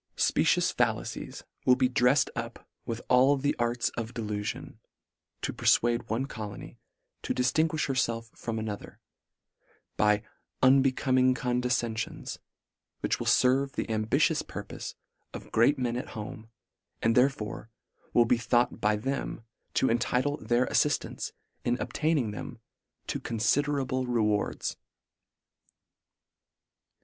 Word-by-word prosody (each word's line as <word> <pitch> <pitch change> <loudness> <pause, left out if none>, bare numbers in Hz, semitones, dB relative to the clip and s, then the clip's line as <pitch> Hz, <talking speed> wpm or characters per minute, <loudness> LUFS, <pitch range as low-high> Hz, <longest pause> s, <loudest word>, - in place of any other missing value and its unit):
Specious - - +3
fallacies - - -2 0.2
will 125 - +6
be 130 0 +3
dreft 125 +2 +3
up - - -6 0.2
with 115 0 -4
all 130 +3 +5
the 145 +2 0
arts 120 0 +1
of 115 0 -6
delu 105 -3 -2
fion, 105 - -5 0.7
to - - -1
perfuade 120 0 +2
one 115 +5 0
colony 105 -6 -8 0.4
to - - -2
diftinguifh 155 +5 +1
herfelf 115 -4 -1
from 115 -1 -4
another, 110 -2 -5 1.0
by 105 0 +3 0.4
unbecoming 130 -1 +4
conde 125 0 -1
fcenfions, 120 -3 -2 0.6
which - - 0
will - - -3
ferve 135 +2 +3
the - - -3
ambitious 140 +9 +2
purpofe - - -7 0.4
of - - -9
great 120 +6 +4
men 120 -2 -1
at 125 - -4
home, 110 +1 -7 0.5
and 115 - +4
there 125 +3 +5
fore 110 -3 -7 0.4
will 120 - +5
bethought 120 +1 +1
by 105 0 +3
them, 130 +1 -3 0.3
to 130 - +3
entitle 125 +5 +1
their 120 +3 +1
affiflants 150 - 0 0.3
in 120 0 +1
obtaining 150 -8 0
them, 105 - -7 0.5
to - - -3
considerable 130 +3 0
rewards. 105 -4 0
125 Hz, 120 wpm, -29 LUFS, 115-130 Hz, 1.0 s, will